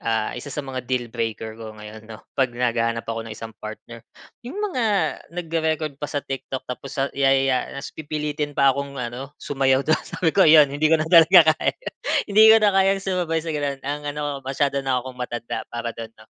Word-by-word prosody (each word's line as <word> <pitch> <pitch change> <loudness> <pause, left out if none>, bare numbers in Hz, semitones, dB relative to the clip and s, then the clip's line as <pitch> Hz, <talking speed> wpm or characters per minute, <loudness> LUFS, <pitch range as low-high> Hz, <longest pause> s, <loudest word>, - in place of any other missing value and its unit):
Ah, 110 -1 -1
isa 125 +4 -7
sa 145 +1 -5
mga 130 -1 -4
deal 125 -2 0
breaker 110 -1 -4
ko 110 -1 -8
ngayon, 110 +1 -11
'no? 110 -1 -11
'Pag 125 -3 0
naghahanap 115 -1 0
ako 115 0 -4
ng 110 - -6
isang 115 0 -8
partner. 110 +2 -9 0.4
'Yong 250 +10 -9
mga 385 - -1 0.4
nagre-record 160 -4 -2
pa 150 - -3
sa 145 -2 -3
TikTok 135 -1 -5
tapos 130 +2 -7
sa 135 0 -1
yayaya 135 -1 +2
tapos 140 0 -7
pipilitin 150 -1 -4
pa 135 -1 +5
akong 140 0 -5
ano, 125 +3 -6
sumayaw 135 -1 +1
do'n. 155 0 +2
Sabi 165 -3 -1
ko - - +2
'yon. 150 -3 +7
Hindi 155 +2 +2
ko 160 - +5
na 155 - -1
talaga 165 0 +7
kaya, - - -2 0.5
hindi 215 +2 +6
ko 220 - +9
na 205 - +4
kayang 195 0 +3
sumabay 175 -4 -1
sa 165 - -3
gano'n. 145 -2 -2
Ang 145 +1 -3 0.2
ano 145 -2 -3
masyado 140 +1 -1
na 130 -2 -1
'kong 130 -1 -9
matanda 120 -1 -5
para 120 -1 -4
do'n, 115 -1 -8
'no? 110 - -17
140 Hz, 200 wpm, -23 LUFS, 120-155 Hz, 0.5 s, ko